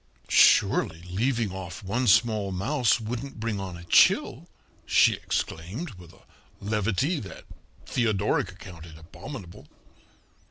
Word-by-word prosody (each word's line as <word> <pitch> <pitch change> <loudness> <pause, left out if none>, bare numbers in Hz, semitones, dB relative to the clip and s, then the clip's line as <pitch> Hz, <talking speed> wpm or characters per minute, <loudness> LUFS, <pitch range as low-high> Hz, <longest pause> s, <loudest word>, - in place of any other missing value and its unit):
"Surely 80 +1 +4
leaving 115 +1 0
off 95 -2 -8
one 120 +7 -1
small 105 -1 +3
mouse 120 +7 +1
wouldn't 120 +3 -6
bring 110 -2 -3
on 95 -3 -6
a 85 - -11
chill," 85 - +3 0.3
she - - +4
exclaimed, 100 - -4
with 90 -4 -14
a - - -22 0.4
levity 105 - -1
that 95 - -10 0.4
Theodoric 105 -5 0
accounted 85 -4 -12
abominable. 90 - -11
100 Hz, 115 wpm, -26 LUFS, 90-120 Hz, 0.4 s, Surely